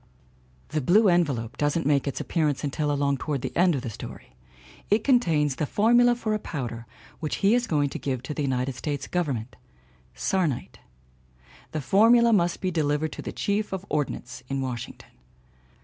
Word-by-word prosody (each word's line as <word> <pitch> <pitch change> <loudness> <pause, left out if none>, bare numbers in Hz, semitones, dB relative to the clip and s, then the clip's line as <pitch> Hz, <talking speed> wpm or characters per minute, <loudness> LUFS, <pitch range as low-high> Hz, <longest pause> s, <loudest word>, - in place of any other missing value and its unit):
The 155 - -1
"Jblue 195 - +5
envelope" 135 -10 0
doesn't 145 +2 0
make 145 -1 +2
its 140 - -2
appearance 155 -5 0
until 145 +1 -1
along 140 -1 +1
toward 140 -2 -3
the 130 - -4
end 175 -1 +4
of 130 - -3
the 120 - -3
story. 65 - -10 0.5
It 210 +1 +3
contains 160 - +2
the 150 - -1
formula 240 - +4
for 220 -2 -2
a 215 - 0
powder 120 - -5 0.3
which 155 -3 -2
he 205 - +6
is 245 0 +2
going 145 -5 +1
to - - -6
give 130 -3 -3
to 140 - -5
the 150 - -3
United 130 -1 -1
States 145 +2 -4
Government 135 -9 -2 0.6
sarnite. 175 -10 -1 0.9
The 155 - -3
for 195 - +4
mula 235 -1 +6
must 175 -4 +1
be 185 - 0
delivered 155 -1 0
to - - -7
the - - -5
Chief 205 +1 -1
of 190 0 -4
Ordnance 130 -4 -3
in 135 0 -1
Washington. 125 -3 -6
150 Hz, 180 wpm, -26 LUFS, 135-190 Hz, 0.9 s, he